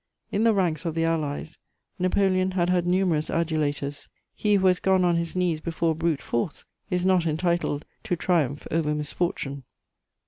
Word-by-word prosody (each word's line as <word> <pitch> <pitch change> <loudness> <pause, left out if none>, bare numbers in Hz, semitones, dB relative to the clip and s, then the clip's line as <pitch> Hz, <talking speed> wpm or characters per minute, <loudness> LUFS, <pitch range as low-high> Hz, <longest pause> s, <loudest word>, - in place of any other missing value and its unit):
In 210 +3 +1
the 225 - +5
ranks 175 -6 0
of 165 -2 -3
the 165 0 +1
Allies, 155 -1 -2 0.4
Napoleon 185 0 +2
had 180 -1 +1
had 175 -1 +1
numerous 175 -4 +1
adulators: 150 -3 -1 0.3
he 210 -1 +2
who 190 -1 +2
has 185 -1 +4
gone 190 -1 +3
on 175 -1 +3
his 170 +1 -2
knees 175 -4 0
before 165 0 0
brute 160 -2 -1
force 120 +5 -2 0.2
is 180 -2 0
not 185 -3 +3
entitled 165 -2 0 0.2
to 195 -5 0
triumph 155 -6 0
over 150 -2 +1
misfortune. 150 -2 -3
170 Hz, 165 wpm, -26 LUFS, 155-185 Hz, 0.4 s, the